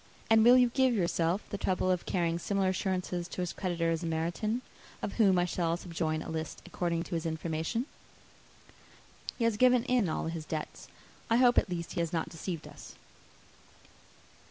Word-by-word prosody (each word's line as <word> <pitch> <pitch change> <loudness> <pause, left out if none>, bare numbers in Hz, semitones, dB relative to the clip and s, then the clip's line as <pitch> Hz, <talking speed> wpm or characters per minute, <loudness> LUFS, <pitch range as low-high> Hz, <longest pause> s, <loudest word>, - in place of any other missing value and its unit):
And 220 0 +7
will 245 +2 +8
you 250 -1 +5
give 260 0 +2
yourself 175 0 0
the 205 - -3
trouble 185 -1 +1
of 180 -1 -1
carrying 170 -2 0
similar 195 +1 0
assurances 180 -2 -2
to 180 - -5
his 180 - -2
creditors 165 -3 -1
in 165 - -2
Meryton, 175 +9 -1 0.4
of 200 - -4
whom 195 -4 +5
I 175 - +3
shall 170 -1 -1
subjoin 160 -3 -2
a - - -8
list, 160 -1 -5
according 170 -1 -2
to - - -8
his 165 0 -1
information? 160 +8 -2 1.5
He 235 - -1
has 230 -2 +2
given 250 0 +5
in 250 -7 +2
all - - -2
his 165 -1 -4
debts; 155 0 -5 0.4
I 230 - +4
hope 245 0 +6
at - - -4
least 170 -1 -4
he - - -3
has 170 -1 -1
not 165 -2 -1
deceived 165 0 -5
us. - - -12
175 Hz, 180 wpm, -30 LUFS, 165-215 Hz, 1.5 s, will